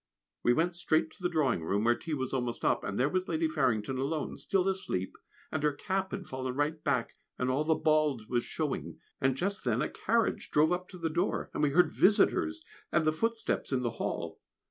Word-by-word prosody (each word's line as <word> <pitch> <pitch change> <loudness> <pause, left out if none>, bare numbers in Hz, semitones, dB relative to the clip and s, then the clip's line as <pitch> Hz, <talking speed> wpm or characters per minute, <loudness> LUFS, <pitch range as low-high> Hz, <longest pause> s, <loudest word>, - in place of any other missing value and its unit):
We 120 - +3
went 170 +6 +1
straight 160 -2 +1
to 195 - -20
the 180 - +1
drawing 145 - +1
room, 100 +6 0
where 120 +1 +5
tea 155 +5 -4
was 130 -2 -3
almost 125 -2 -2
up, - - +2
and 100 - -3
there 130 - +4
was 185 +4 -1
Lady 320 +1 +1
Farrington 130 - 0
alone 145 +3 -2
still 195 -1 0
asleep, 185 - -1 0.4
and 155 - -1
her 150 -1 +2
cap 190 +5 -2
had 195 - -5
fallen 130 -1 -4
right 150 +2 -1
back, - - 0 0.2
and 125 0 0
all 140 +4 +1
the 160 +1 +2
bald 150 -8 +2
was 120 -1 0
showing; - - -3 0.2
and 130 0 +2
just 195 +4 -1
then 120 -2 +1
a 150 - 0
carriage 230 0 0
drove 155 +3 +4
up 180 +1 -2
to 185 - -10
the 165 -2 -2
door, 170 +2 -1
and - - -2
we 150 - +4
heard 175 +6 +4
visitors 310 - +3 0.3
and 155 0 +2
the 155 - +3
footsteps 225 +2 -1
in 130 -2 +1
the 120 - 0
hall. - - -3
155 Hz, 215 wpm, -31 LUFS, 130-180 Hz, 0.4 s, where